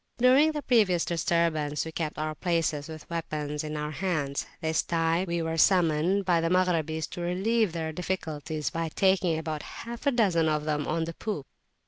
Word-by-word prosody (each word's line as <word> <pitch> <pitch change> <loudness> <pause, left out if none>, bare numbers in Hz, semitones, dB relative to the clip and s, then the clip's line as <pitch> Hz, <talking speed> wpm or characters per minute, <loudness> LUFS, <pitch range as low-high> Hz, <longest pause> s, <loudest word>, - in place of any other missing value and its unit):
During 265 +6 +5
the 295 -1 -4
previous 205 -9 +3
disturbance 165 -3 0
we 160 - -5
kept 160 -1 -3
our 155 0 -2
places 160 -3 -1
with 160 -1 -9
weapons 150 -3 -3
in 155 0 -4
our 150 0 -3
hands. 150 -5 -2
This 160 -1 +1
time 165 +2 +1
we 170 -1 -1
were 160 0 -2
summoned 180 +2 +3
by 175 -2 +3
the 165 - 0
Maghrabis 165 -4 +1
to 175 - -6
relieve 195 +4 +1
their 160 -1 -3
difficulties, 160 -3 -3
by 165 0 -2
taking 185 -2 +2
about 155 -1 -3
half 235 - -7
a - - +5
dozen 185 -10 +2
of 150 -1 0
them 150 -1 -1
on 165 - 0
the 165 +1 -4
poop. 200 -7 -4
165 Hz, 180 wpm, -28 LUFS, 155-185 Hz, -, During